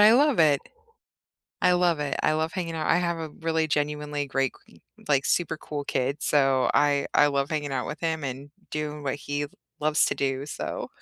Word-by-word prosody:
I 210 +1 +8
love 280 +2 +4
it. 150 -4 +5 1.0
I 180 - +5
love 175 -3 +2
it. 145 -2 -1
I - - +3
love 160 +1 -1
hanging 170 -3 -3
out. 155 -1 -2
I - - +4
have 170 -1 0
a 160 -1 -5
really 160 +1 -1
genuinely 150 -1 -1
great 135 -1 0
k - - -20 0.3
like, 140 -2 +2
super 165 -2 +1
cool 150 -1 -5
kid, 135 +1 -1
so 135 -3 +3
I 145 -1 +3
I 145 - +6
love 140 0 0
hanging 145 -3 -2
out 130 -2 -2
with - - -6
him 160 -2 -1
and 135 +2 -5 0.2
doing 150 -1 -4
what 135 - -1
he 145 0 -3 0.3
loves 150 0 +3
to - - -1
do, 135 0 -1
so 150 - -5
150 Hz, 200 wpm, -26 LUFS, 140-160 Hz, 1.0 s, I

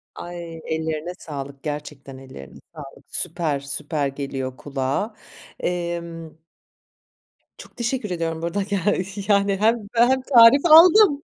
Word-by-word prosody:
Ay, 170 -2 -8
ellerine 160 +1 -3
sağlık, 140 -2 -8
gerçekten 145 -3 -7
ellerine 130 0 -12 0.2
sağlık. 140 -3 -12
Süper, 165 -4 0
süper 145 +1 -3
geliyor 135 -2 -5
kulağa. 140 - -3 0.4
Emm 170 -2 -5 1.2
Çok - - -15
teşekkür 240 -2 -3
ediyorum 165 -2 -3
bu - - -3
arada. 185 +4 -2
Ge 200 0 -2 0.5
yani, 200 -1 +2
hem 220 +1 +1
hem 245 +3 +3
tarif 255 +3 +6
aldım, 330 -1 +7
170 Hz, 115 wpm, -22 LUFS, 145-210 Hz, 1.2 s, aldım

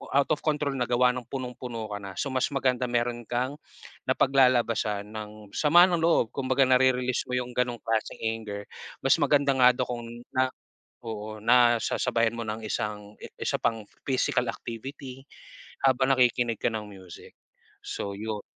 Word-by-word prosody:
out 140 - +3
of 150 - +2
control 150 -2 0
na 125 -2 0
gawa 125 +1 +4
ng 125 -2 -6
punong-puno 125 -4 -5
ka 105 - -3
na. 100 -1 -8
So, 140 - -2
mas 130 -1 +1
maganda 130 -2 +1
meron 120 0 -1
kang, 130 +4 -1 0.5
napaglalabasan 120 -6 +2
ng 105 -1 -9
sama 170 +4 +6
ng 175 -2 0
loob. 165 -9 +3
Kumbaga, 130 0 +2
nare-release 130 -1 +3
mo 125 - -1
yung 125 0 -5
ganong 125 -1 0
klaseng 110 -1 -1
anger. 110 -2 -3 0.4
Mas - - +5
maganda 140 -1 +3
nga 125 -1 +7
daw 125 0 -1
kung 120 -1 -4 0.3
na 130 0 +3
na, - - -18 0.5
oo, 110 -1 -6
nasasabayan 115 -1 +3
mo 115 - -4
ng 110 +1 -3
isang 105 0 -4 0.2
isa - - -1
pang 110 -2 -1 0.2
physical 125 -1 +1
activity, 130 +3 -8 0.6
habang 130 0 +3
nakikinig 120 -2 +2
ka - - 0
ng 105 -1 -5
music. 95 -3 -13 0.5
So, 100 - -4
yun. 105 0 -4
120 Hz, 160 wpm, -27 LUFS, 110-130 Hz, 0.6 s, nga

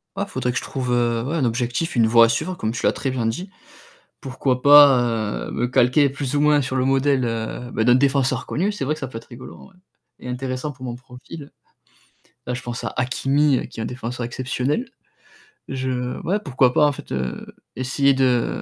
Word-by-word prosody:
Ouais, 200 - -2
faudrait 130 -8 -2
que 125 - -3
je - - -2
trouve, 130 -2 -4
heu, 120 -1 +1
ouais, 145 +6 -3
un 140 -6 +1
objectif, 120 +7 -2
une 115 -2 +4
voie 115 0 +6
à 115 - +1
suivre 180 +11 -2
comme 110 -9 -2
tu 120 - -4
l'as - - +5
très 135 - -3
bien 125 -3 -2
dit. 175 - -4 0.7
Pourquoi 130 -1 -2
pas, 125 -7 +5
heu, - - -6
me 125 - -1
calquer 125 +3 +3
plus 140 0 -3
ou 145 - +2
moins 150 -1 +4
sur 130 0 -3
le 130 - +1
modèle, 135 0 +2
heu, 115 +1 -4
ben, 110 - 0
d'un 125 - +5
défenseur 135 -2 +1
connu. 190 +7 -1
C'est 205 - -4
vrai 150 - 0
que - - -12
ça 135 - -4
peut 115 -2 -7
être 115 - -15
rigolo 125 0 -11
en - - -14
vrai, 195 - -21 0.4
et 125 - -8
intéressant 130 +3 -4
pour 130 -1 -12
mon 120 - -4
profil. 130 +4 -12 1.0
Là, 125 - -3
je 125 - -4
pense 120 -1 -6
à - - -4
Hakimi 135 +2 +1
qui - - -10
est - - -2
un - - -3
défenseur 125 0 -5
exceptionnel. 130 - -2 0.8
Je 130 -1 -3
ouais, 200 +4 0
pourquoi 130 -3 +2
pas, 150 - +4
en 145 - +3
fait, 140 - -10
heu, 65 -1 -4 0.3
essayer 135 +2 +2
de 130 -3 +1
130 Hz, 220 wpm, -22 LUFS, 120-140 Hz, 1.0 s, voie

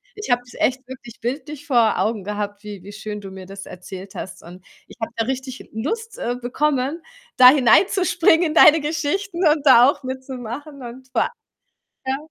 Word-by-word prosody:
Ich 420 -10 -5
habe 245 0 +3
dich 245 - -14
echt 260 0 0
wirklich 250 -3 -11
bildlich 290 +4 -5
vor 235 -5 +3
Augen 215 -3 -1
gehabt, 205 0 -5
wie 205 -3 -8
wie 205 - -10
schön 210 0 -7
du 195 - -8
mir 190 -1 -10
das 195 +1 -10
erzählt 185 +1 -10
hast 185 - -7
und 180 +2 -13 0.2
ich - - -15
habe 225 - -4
da 225 - -1
richtig 260 0 -5
Lust, 445 - -4
äh, 245 +1 -2
bekommen, 280 +4 -1 0.4
da 250 0 +10
hineinzuspringen 335 - +4
in 305 - -3
deine 315 -1 +7
Geschichten 335 +4 -2
und 300 -1 +2
da 250 -2 +8
auch 285 - -3
mitzumachen 260 +2 -7
und 250 +2 -10
vor - - +1 0.8
ja. 265 +1 0
255 Hz, 180 wpm, -21 LUFS, 215-295 Hz, 0.8 s, da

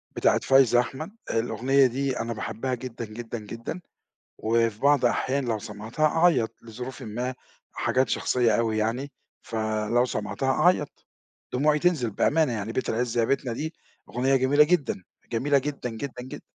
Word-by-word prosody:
بتاعة - - +3
فايزة 135 -3 +5
أحمد، 135 +8 -3 0.2
الأغنية 125 +4 +2
دي 130 +1 -2
أنا 115 0 -2
باحبها 115 +3 -3
جدًا، 120 -1 -5
جدًا، 115 +2 -6
جدًا 115 - -7 0.6
وفي 115 -1 +1
بعض 140 -1 +4
أحيان 130 +3 +1
لو 115 -3 -1
سمعتها 110 +8 -2
أعيّط، 160 -7 +2
لظروفٍ 125 +3 -8
ما 120 +4 -4 0.4
حاجات 130 +1 +1
شخصية 120 -3 +2
أوي 115 -2 0
يعني، 120 +6 -1 0.3
فلو 110 +2 0
سمعتها 105 +2 -2
أعيّط 155 0 +1 0.5
دموعي 150 +4 +3
تنزل 155 -9 +2
بأمانة 155 +6 +2
يعني، 110 0 -3
بيت 130 - -1
العز 120 +1 -1
يا 115 - +4
بيتنا 130 -1 0
دي 155 +7 -4 0.4
أغنية 130 +3 +2
جميلة 135 +3 +5
جدًا 150 - 0 0.3
جميلة 135 +5 +2
جدًا، 140 -2 -3
جدًا، 125 +3 -6
جدًا. 130 - -8
125 Hz, 150 wpm, -26 LUFS, 115-140 Hz, 0.6 s, فايزة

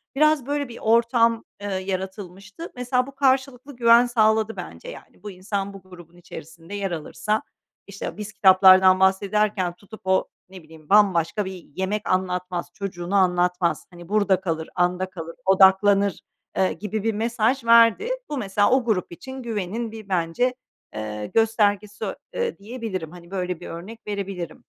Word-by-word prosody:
Biraz 305 -2 +3
böyle 285 -1 -2
bir 235 - -9
ortam, 230 0 +3 0.2
ııı, 195 -2 -2
yaratılmıştı. 190 - -6
Mesela, 250 +1 0
bu 275 - -12
karşılıklı 265 0 0
güven 235 0 +6
sağladı, 220 -2 +2
bence, - - -9
yani. - - -13
Bu 205 - -6
insan 195 +1 -4
bu 195 - -11
grubun 175 -2 -15
içerisinde 165 +2 -11
yer 200 -2 -3
alırsa, 210 +6 -2 0.5
işte, 200 +1 -7
biz 210 0 -7
kitaplardan 185 -1 +6
bahsederken 195 -1 +1
tutup 205 +4 -14
o, 190 0 +2 0.2
ne 185 -3 -12
bileyim, 155 -1 -17
bambaşka 195 -1 +3
bir 185 -2 -8
yemek 200 +3 -2
anlatmaz, 180 -1 -1
çocuğunu 185 -2 -4
anlatmaz, 180 -2 +1
hani, 175 0 -13
burada 200 -3 +2
kalır, 160 -3 -3
anda 180 +1 0
kalır, 165 -2 -8
odaklanır, 195 0 +4 0.4
eee, 190 - +2
gibi 210 0 -4
bir 225 - 0
mesaj 230 +3 0
verdi. 230 - +5 0.2
Bu 295 - -3
mesela 205 -2 +1
o 260 -1 +3
grup 190 -6 -1
için 260 +9 -9
güvenin 220 +1 -3
bir, 215 -3 -11
bence, 185 +9 0 0.4
eee, 105 -1 -5
göstergesi, 210 -2 +1 0.3
eee, 475 -1 -2
diyebilirim, 205 -7 -6
hani, 175 0 -14
böyle 180 -2 -3
bir - - -9
örnek 190 +7 -8
verebilirim. 195 -5 -5
200 Hz, 150 wpm, -23 LUFS, 180-225 Hz, 0.5 s, güven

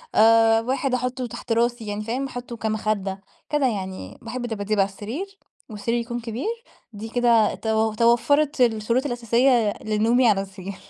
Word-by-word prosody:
آآ 225 0 +5
واحد 260 +2 -1
أحطه 250 0 -1
تحت 235 - -8
راسي 235 -1 +1
يعني 205 +1 -3
فاهم؟ 245 +5 -2
أحطه 245 -2 -7
كمخدة، 215 -3 -2 0.3
كده 295 -3 +2
يعني 190 - -5
باحب 240 +2 -5
دباديب 215 -2 -2
على 195 0 +3
السرير، 280 - -7 0.3
والسرير 220 +2 -2
يكون 240 +1 -4
كبير. 230 - -4 0.5
دي 215 +2 -7
كده 235 -3 +3
تو 220 0 0
توفرت 255 +6 +2
الشروط 230 +2 +2
الأساسية 240 -2 +2
لنومي 225 +3 +2
على 195 -2 +2
السرير. 195 0 -8
230 Hz, 150 wpm, -23 LUFS, 215-245 Hz, 0.5 s, آآ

